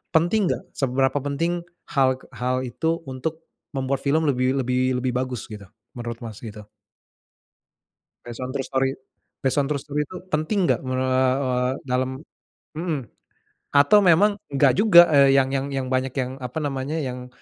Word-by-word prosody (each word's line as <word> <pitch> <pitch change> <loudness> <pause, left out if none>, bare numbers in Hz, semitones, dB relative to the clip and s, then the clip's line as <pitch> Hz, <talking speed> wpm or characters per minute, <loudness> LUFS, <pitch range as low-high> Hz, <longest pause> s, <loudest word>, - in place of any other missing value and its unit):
penting 180 +5 +3
nggak - - -3
seberapa 135 +1 +1
penting 165 +5 -1 0.3
hal 130 -2 +3
k - - -21
hal 125 +1 -1
itu 160 +7 -1
untuk, 160 +5 -5 0.3
membuat 135 0 -1
film 155 +3 +2
lebih 130 -1 +1
lebih 130 0 +1
lebih 125 0 -1
bagus 125 -3 -3
gitu, 105 -1 -8 0.3
menurut 120 -1 -5
Mas 110 -3 -8
gitu? 105 -2 -8 1.6
Based 120 +1 -8
on 125 - -4
true 135 -1 -2
story 135 0 0 0.5
based 135 +2 +2
on 140 - -1
true 150 - 0
story 150 0 -2
tuh 185 0 -9
penting 175 +5 +1
nggak - - +1
mere 130 -1 -3 0.4
we 130 -2 0 0.3
dalam, 130 0 0 0.7
mhm. 165 -3 -1 0.8
Atau 145 +9 +6
memang 200 +3 +4
nggak 140 -1 +3
juga, 175 - +7
eee, 140 -1 +6
yang 135 0 +2
yang 135 0 -1
yang 135 -2 -3
banyak 130 0 0
yang 130 0 -3
apa 125 +4 -5
namanya 140 +2 -2
yang, 125 -4 -4
135 Hz, 160 wpm, -23 LUFS, 130-155 Hz, 1.6 s, juga